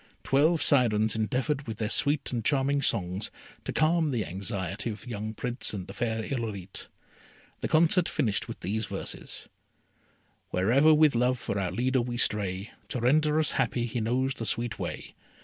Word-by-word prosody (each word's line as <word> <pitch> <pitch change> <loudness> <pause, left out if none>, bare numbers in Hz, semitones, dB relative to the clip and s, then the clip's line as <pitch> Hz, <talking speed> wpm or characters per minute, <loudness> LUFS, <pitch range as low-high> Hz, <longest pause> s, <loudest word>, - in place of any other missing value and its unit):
Twelve 155 +4 +3
Syrens 110 -6 +3
endeavoured 130 +6 -1
with 110 -2 -5
their 110 - -1
sweet 145 +1 +1
and 115 -2 -1
charming 140 +1 +2
songs 95 -4 0 0.4
to - - -2
calm 160 0 +2
the 120 -6 -1
anxiety 100 +2 -3
of 105 -2 -6
the - - -11
young 110 -1 -4
Prince 120 -1 -2
and 95 -3 -5
the 100 - -9
fair 110 0 -2
Irolite. 105 -7 -5 0.7
The - - -2
concert 170 +3 +4
finished 115 -9 0
with - - -8
these 110 +4 -2
verses: - - -5 1.0
Wherever 125 +12 +4
with 155 -1 +5
Love 125 +2 +2
for 100 -4 -3
our 95 -2 -1
leader 130 +1 +1
we 120 0 -3
stray, 100 -3 -1 0.2
To 125 - -3
render 150 +5 +3
us 155 - +3
happy 120 -1 0
he 120 0 -3
knows 130 +4 0
the 115 - -6
sweet 120 +1 0
way. - - -5
120 Hz, 170 wpm, -28 LUFS, 105-140 Hz, 1.0 s, with